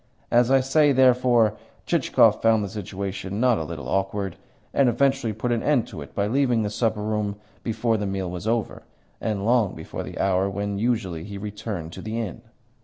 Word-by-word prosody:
As 120 Hz, 0 st, +4 dB
I 135 Hz, 0 st, +5 dB
say, 145 Hz, +3 st, +4 dB
therefore, 125 Hz, -4 st, +4 dB, 0.3 s
Chichikov -, -, +3 dB
found 110 Hz, -2 st, +4 dB
the 100 Hz, -, -4 dB
situation 100 Hz, 0 st, -5 dB
not 125 Hz, -2 st, +3 dB
a -, -, -2 dB
little 80 Hz, -1 st, -6 dB
awkward, 95 Hz, -1 st, -1 dB, 0.4 s
and 135 Hz, -3 st, +4 dB
eventually 135 Hz, -1 st, +1 dB
put 110 Hz, +3 st, -2 dB
an 115 Hz, -1 st, +1 dB
end 145 Hz, -6 st, +2 dB
to 75 Hz, -, -8 dB
it 70 Hz, -, -11 dB
by 100 Hz, -, +1 dB
leaving 125 Hz, 0 st, +2 dB
the 105 Hz, -, -2 dB
supper 110 Hz, -1 st, 0 dB
room 105 Hz, -1 st, -1 dB, 0.3 s
before 115 Hz, 0 st, 0 dB
the 105 Hz, -1 st, -2 dB
meal 95 Hz, -2 st, -3 dB
was 90 Hz, +4 st, -5 dB
over, 115 Hz, 0 st, -1 dB, 0.4 s
and 105 Hz, -2 st, -2 dB
long 115 Hz, -4 st, +2 dB
before 80 Hz, -, -6 dB
the -, -, -7 dB
hour 95 Hz, 0 st, +2 dB
when 100 Hz, 0 st, -3 dB
usually 105 Hz, -8 st, -1 dB
he 100 Hz, +1 st, -7 dB
returned 100 Hz, -5 st, -5 dB
to -, -, -8 dB
the 110 Hz, +2 st, -3 dB
inn. 110 Hz, -1 st, -5 dB
105 Hz, 190 wpm, -24 LUFS, 100-120 Hz, 0.4 s, I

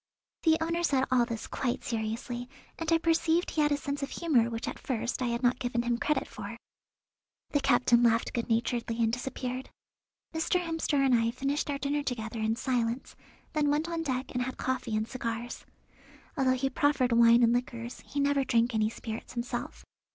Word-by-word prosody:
The 320 Hz, -1 st, +4 dB
owner 335 Hz, +1 st, 0 dB
said 275 Hz, -6 st, +2 dB
all 245 Hz, -2 st, +4 dB
this 230 Hz, -3 st, -4 dB
quite 245 Hz, -2 st, -2 dB
seriously, 235 Hz, +2 st, -3 dB, 0.3 s
and 330 Hz, 0 st, -2 dB
I 330 Hz, -, +6 dB
perceived 330 Hz, +1 st, +2 dB
he 310 Hz, -, +1 dB
had 295 Hz, 0 st, +3 dB
a 290 Hz, -, +3 dB
sense 285 Hz, 0 st, -4 dB
of 275 Hz, -, -2 dB
humour 255 Hz, -9 st, +2 dB
which 230 Hz, -1 st, -4 dB
at -, -, -4 dB
first 240 Hz, 0 st, -2 dB
I 250 Hz, -, +1 dB
had 235 Hz, +1 st, -2 dB
not 245 Hz, 0 st, +3 dB
given 245 Hz, -1 st, -1 dB
him 240 Hz, 0 st, 0 dB
credit 300 Hz, -3 st, 0 dB
for. -, -, -7 dB, 0.9 s
The 290 Hz, -, +3 dB
captain 245 Hz, -2 st, +4 dB
laughed 230 Hz, -1 st, +3 dB
good 235 Hz, -1 st, -2 dB
naturedly 230 Hz, 0 st, 0 dB
and 225 Hz, 0 st, +1 dB
disappeared. 255 Hz, 0 st, -4 dB, 0.6 s
Mr. 320 Hz, +3 st, +1 dB
Hemster 325 Hz, -3 st, -1 dB
and 265 Hz, -, +4 dB
I 230 Hz, -1 st, +3 dB
finished 275 Hz, +5 st, -1 dB
our 285 Hz, -, 0 dB
dinner 285 Hz, +1 st, -1 dB
together 225 Hz, -4 st, -4 dB
in 220 Hz, +1 st, +1 dB
silence, 245 Hz, -1 st, -1 dB, 0.4 s
then 300 Hz, -2 st, +2 dB
went 300 Hz, +3 st, +1 dB
on 335 Hz, -1 st, -2 dB
deck 260 Hz, -4 st, -2 dB
and 250 Hz, -, -1 dB
had 255 Hz, +1 st, -3 dB
coffee 260 Hz, -4 st, -2 dB
and 215 Hz, +1 st, 0 dB
cigars. 235 Hz, -1 st, -5 dB, 0.7 s
Although 265 Hz, -3 st, +3 dB
he 270 Hz, +1 st, -1 dB
proffered 270 Hz, -3 st, +2 dB
wine 235 Hz, +1 st, +6 dB
and 235 Hz, 0 st, +5 dB
liqueurs 240 Hz, -1 st, -3 dB
he 285 Hz, -, -4 dB
never 280 Hz, 0 st, +3 dB
drank 235 Hz, -1 st, +2 dB
any 215 Hz, -1 st, +2 dB
spirits 225 Hz, 0 st, -7 dB
himself. 240 Hz, +1 st, -4 dB
250 Hz, 190 wpm, -30 LUFS, 235-285 Hz, 0.9 s, I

